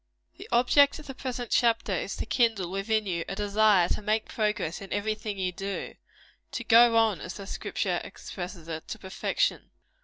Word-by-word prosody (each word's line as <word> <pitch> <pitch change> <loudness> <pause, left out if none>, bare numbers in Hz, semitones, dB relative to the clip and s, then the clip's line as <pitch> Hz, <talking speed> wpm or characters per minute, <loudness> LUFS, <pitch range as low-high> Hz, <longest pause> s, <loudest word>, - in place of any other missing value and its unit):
The - - -11
object 255 +4 +5
of 305 - -11
the 270 - -7
present 250 -3 -5
chapter 230 -4 +2
is 185 - -2
to - - -4
kindle 225 -8 +1
within 215 +3 0
you 170 -3 -2
a 195 - -3
desire 205 -2 +3
to - - -1
make 215 +1 0
progress 210 -6 -1
in 195 - -9
every 205 +1 0
thing 215 -1 -5
you 185 -1 -1
do 195 +2 -5 0.6
to 235 - -3
go 230 0 +6
on, 220 -4 +3
as 180 - -6
the 200 - -8
Scripture - - -2
expresses 175 -3 -8
it, 160 -1 -6
to - - -5
perfection. 195 - -1
210 Hz, 185 wpm, -28 LUFS, 190-230 Hz, 0.6 s, go